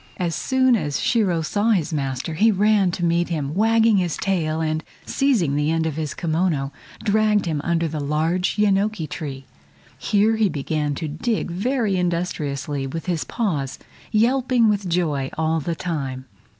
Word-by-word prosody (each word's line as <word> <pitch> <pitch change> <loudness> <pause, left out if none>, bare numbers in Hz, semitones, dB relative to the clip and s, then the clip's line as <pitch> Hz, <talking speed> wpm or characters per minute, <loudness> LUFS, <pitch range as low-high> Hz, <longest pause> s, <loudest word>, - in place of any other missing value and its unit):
As 175 -2 -1
soon 260 - +2
as 145 -9 -1
Shiro 190 -8 +1
saw 205 +7 0
his 170 -5 0
master 135 +1 -2
he 210 +8 +4
ran 205 -1 +3
to 175 0 -2
meet 170 +1 +1
him, 150 -4 -2
wagging 225 +2 +4
his 175 -4 0
tail, 160 -5 0
and, 155 0 -1 0.2
seizing 220 - +1
the 150 +1 +1
end 165 0 +1
of 160 -3 -2
his 155 -2 -3
kimono, 160 -4 0 0.3
dragged 210 -1 +2
him 155 -4 -1
under 170 -1 +1
a 155 -1 -3
large 160 +5 0
yenoki 205 -3 +2
tree. 135 -4 -6 0.5
Here 210 - +2
he 215 -3 +3
began 150 -1 -2
to 160 - -4
dig 175 +7 -2
very 215 +1 0
industriously 150 -6 -2
with 165 +5 -5
his 175 -4 -1
paws, 150 - -2 0.3
yelping 240 +1 +3
with 200 -3 0
joy 155 -6 0
all 160 0 +1
the 165 +3 -3
time. 135 -7 -4
170 Hz, 165 wpm, -22 LUFS, 150-205 Hz, 0.5 s, he